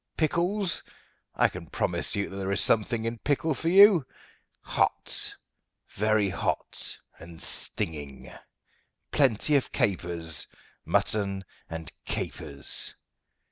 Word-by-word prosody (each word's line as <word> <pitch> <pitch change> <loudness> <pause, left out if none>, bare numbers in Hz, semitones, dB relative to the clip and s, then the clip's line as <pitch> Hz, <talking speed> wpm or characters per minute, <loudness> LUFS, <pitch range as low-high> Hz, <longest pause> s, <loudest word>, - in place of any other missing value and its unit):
Pickles? 175 +4 +1 0.5
I - - +5
can - - -8
promise - - 0
you 100 -1 0
that 95 - -8
there 95 0 -2
is 100 - +2
something 110 +1 +2
in 115 0 -3
pickle 150 +4 +1
for 165 +4 -1
you, 195 -3 +8 0.6
hot - - 0 0.6
very 110 0 +2
hot 95 - -2 0.2
and 85 -1 -11
stinging. 75 -6 -3 0.8
Plenty 140 +1 +3
of 135 - -2
capers 85 -5 -1 0.4
mutton 100 -2 +1 0.3
and 80 0 -5
capers. 70 -1 -3
105 Hz, 105 wpm, -28 LUFS, -, 0.8 s, you